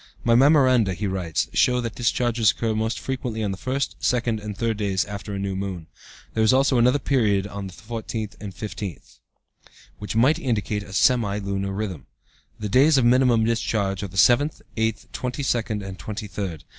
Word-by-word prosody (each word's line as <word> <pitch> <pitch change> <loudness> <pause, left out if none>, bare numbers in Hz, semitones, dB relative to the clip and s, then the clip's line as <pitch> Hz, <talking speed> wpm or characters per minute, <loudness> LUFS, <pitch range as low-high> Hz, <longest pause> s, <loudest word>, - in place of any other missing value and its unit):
"My 115 - +3
memoranda," 130 - +4
he 105 - -4
writes, 95 -4 -1
"show 125 -1 +3
that 115 -3 -3
discharges 120 -2 +1
occur 115 0 0
most 110 -1 -1
frequently 125 -2 -3
on 100 - -1
the - - -3
first, 130 +8 -3
second, 120 -3 0
and 105 -1 -7
third 115 -2 -1
days 100 -2 0
after 105 0 -6
new 100 -1 -3
moon. 95 -4 -4 0.5
There 110 - 0
is 110 +3 +4
also 135 -1 +3
another 125 +4 +4
period 110 -9 +1
on 100 -1 -6
the 95 - -10
fourteenth 110 0 -6
and 105 -2 -6
fifteenth, 100 -4 -7 0.8
which 105 0 -5
might 130 +7 +4
indicate 105 -4 -1
a 100 -1 -11
semi 110 -3 +3
lunar 100 -1 -3
rhythm. 95 -5 -5 0.5
The 105 - -3
days 135 +8 +5
of 130 - +3
minimum 120 -2 +4
discharge 105 -4 0
are 100 - -3
the 95 0 -11
seventh, 125 - +3
eighth, 110 -1 -1
twenty 125 +3 -3
second, 115 -5 -1
and 95 0 -8
twenty 110 0 -5
third." 95 -6 -5
110 Hz, 180 wpm, -24 LUFS, 100-120 Hz, 0.8 s, days